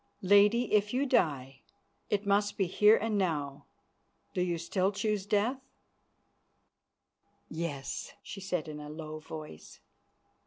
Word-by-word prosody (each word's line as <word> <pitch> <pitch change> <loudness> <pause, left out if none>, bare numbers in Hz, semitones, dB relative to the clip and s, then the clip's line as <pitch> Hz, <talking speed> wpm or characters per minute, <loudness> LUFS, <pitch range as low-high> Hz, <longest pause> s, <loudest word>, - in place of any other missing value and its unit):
Lady, 205 +5 +4
if 210 +2 +2
you 275 +2 +2
die, 140 - 0 0.5
it 205 0 0
must 205 +1 +1
be 195 - +2
here 210 +5 +5
and 215 -2 -1
now. 145 -7 -2 0.7
Do 180 - -1
you 175 -1 0
still 185 +3 0
choose 210 -1 -2
death?" 220 +6 +1 1.9
"Yes," 150 -4 -4
she 195 - -8
said 180 -4 -2
in 150 -1 -7
a 150 0 -8
low 155 0 -7
voice. 155 - -10
190 Hz, 125 wpm, -31 LUFS, 155-210 Hz, 1.9 s, here